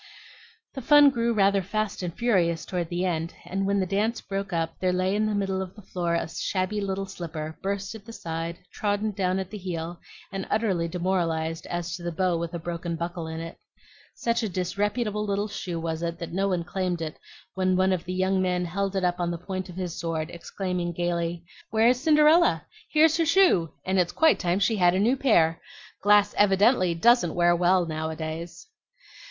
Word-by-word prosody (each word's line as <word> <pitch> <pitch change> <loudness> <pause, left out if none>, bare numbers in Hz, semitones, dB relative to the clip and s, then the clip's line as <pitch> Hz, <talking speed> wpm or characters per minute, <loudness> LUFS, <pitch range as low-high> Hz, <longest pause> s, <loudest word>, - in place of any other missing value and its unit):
The 270 - -6
fun 290 +2 +7
grew 235 -2 0
rather 200 -2 +3
fast 210 +2 -2
and 180 -2 -3
furious 175 -6 +1
toward 175 -3 -3
the 175 +1 -1
end, 165 -2 -2
and 195 +2 -2
when 200 0 +2
the 190 - +1
dance 210 +5 0
broke 195 0 -4
up 165 -1 -2
there 185 -1 +1
lay 185 +2 +1
in 215 +1 +1
the 215 - -1
middle 195 -1 -1
of 185 -1 -7
the 210 - -13
floor 175 -2 -2
a 170 - -1
shabby 190 +5 -2
little 195 0 -2
slipper, 160 -4 -6
burst 200 +1 -3
at 215 -2 -11
the 230 - -9
side, 165 -4 -5 0.2
trodden 210 +1 -1
down 185 -2 0
at 190 -1 -4
the 210 - -6
heel, 170 -2 -5 0.3
and 195 -1 -4
utterly 195 -6 +1
demoralized 165 -2 -1
as 175 0 -3
to 180 - -9
the 175 0 -3
bow 180 +1 +1
with 170 +1 -3
a - - -1
broken 170 0 -4
buckle 170 0 -4
in 160 0 -5
it. 165 0 -8 0.6
Such 235 0 0
a 220 - -1
disreputable 205 +4 -1
little 205 0 -1
shoe 180 -4 -5
was 165 0 -3
it 170 0 -3
that 170 -1 -7
no 195 +2 +1
one 180 -3 0
claimed 180 -1 -2
it 155 - -6 0.3
when 185 -1 +1
one 185 +1 +3
of 180 -2 -3
the 180 - -4
young 190 +1 +1
men 180 -1 0
held 195 +3 -2
it 190 - 0
up 180 0 +1
on 175 -1 0
the 170 - -3
point 185 +2 -5
of 175 - -9
his 180 -3 -4
sword, 165 -1 -3
exclaiming 175 0 -3
gayly, 170 0 -2 0.2
"Where 225 +1 +4
is 250 0 +1
Cinderella? 310 +2 +4 0.2
Here's 315 0 +4
her 330 - +2
shoe, 325 - +4
and 190 0 +1
it's 175 -1 +2
quite 320 -1 +4
time 175 0 +1
she 215 +2 +1
had 175 -1 +4
a - - +1
new 230 +6 +3
pair. 170 -12 +3 0.4
Glass 205 0 +4
evidently 195 -2 +4
doesn't 225 -2 +4
wear 175 0 +4
well 180 +1 +3
now 160 -1 -3
a 160 - -5
days." 165 +2 -6
185 Hz, 210 wpm, -26 LUFS, 170-205 Hz, 0.6 s, fun